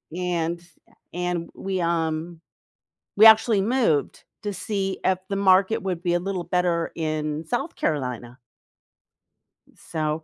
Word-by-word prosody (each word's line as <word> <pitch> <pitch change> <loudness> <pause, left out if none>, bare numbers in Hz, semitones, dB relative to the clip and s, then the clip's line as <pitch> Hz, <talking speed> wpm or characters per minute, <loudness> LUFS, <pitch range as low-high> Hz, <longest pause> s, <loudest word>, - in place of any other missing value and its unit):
and 170 -1 -2 0.5
and 180 -1 -2
we, 190 -2 -3
um, 165 0 -1 0.8
we 215 - +8
actually 220 -2 +7
moved 220 - 0 0.2
to 205 - -3
see 195 -1 -3
if 190 -1 +2
the 195 - -1
market 195 +3 +3
would 180 -3 -3
be 175 -1 0
a 175 - +2
little 185 -1 -4
better 175 -2 0
in 155 -1 -2
South 275 - -3
Carolina. 125 -4 -3 1.4
So 155 -1 -3
175 Hz, 125 wpm, -24 LUFS, 160-195 Hz, 1.4 s, we